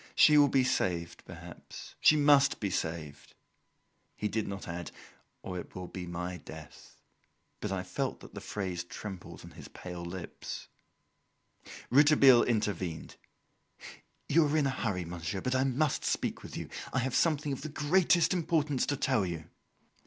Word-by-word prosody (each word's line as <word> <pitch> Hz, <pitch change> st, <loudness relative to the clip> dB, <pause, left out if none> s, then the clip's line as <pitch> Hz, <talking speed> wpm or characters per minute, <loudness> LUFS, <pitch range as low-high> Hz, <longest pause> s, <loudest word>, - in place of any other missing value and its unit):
"She 150 Hz, -, +7 dB
will 145 Hz, -1 st, +7 dB
be 130 Hz, 0 st, +3 dB
saved 90 Hz, -9 st, -1 dB
perhaps. -, -, -11 dB
She 155 Hz, -, +7 dB
must 145 Hz, -2 st, +5 dB
be 100 Hz, -2 st, -2 dB
saved!" 80 Hz, -4 st, -4 dB, 0.8 s
He 105 Hz, -, -2 dB
did 110 Hz, 0 st, -2 dB
not 100 Hz, -1 st, -6 dB
add 85 Hz, -1 st, -5 dB, 0.5 s
"or 90 Hz, -1 st, -4 dB
it -, -, -10 dB
will 90 Hz, -, -5 dB
be 90 Hz, 0 st, -7 dB
my 90 Hz, +1 st, -4 dB
death"; -, -, -12 dB, 0.6 s
but 105 Hz, -, -4 dB
I 95 Hz, -1 st, -2 dB
felt 90 Hz, 0 st, -3 dB
that -, -, -13 dB
the -, -, -7 dB
phrase 95 Hz, -4 st, -3 dB
trembled 95 Hz, +1 st, -8 dB
on -, -, -12 dB
his -, -, -11 dB
pale 90 Hz, -1 st, -8 dB
lips. 85 Hz, +1 st, -7 dB, 1.2 s
Rouletabille 140 Hz, -2 st, +7 dB
intervened: 100 Hz, -7 st, -2 dB, 1.1 s
"You 155 Hz, +1 st, +4 dB
are 150 Hz, +2 st, +1 dB
in 150 Hz, -, +3 dB
a 135 Hz, -, +1 dB
hurry, 100 Hz, -9 st, -2 dB
Monsieur; 85 Hz, +2 st, -4 dB
but 125 Hz, +6 st, -1 dB
I 130 Hz, +1 st, +2 dB
must 135 Hz, +2 st, 0 dB
speak -, -, -1 dB
with -, -, -8 dB
you. -, -, -5 dB, 0.2 s
I -, -, -2 dB
have 130 Hz, 0 st, 0 dB
something 150 Hz, -3 st, +2 dB
of 135 Hz, -, -6 dB
the 155 Hz, -, -5 dB
greatest 170 Hz, +5 st, +3 dB
importance 155 Hz, -6 st, +1 dB
to 145 Hz, -, 0 dB
tell 130 Hz, -6 st, +1 dB
you." 85 Hz, -3 st, -4 dB
110 Hz, 160 wpm, -31 LUFS, 90-145 Hz, 1.2 s, She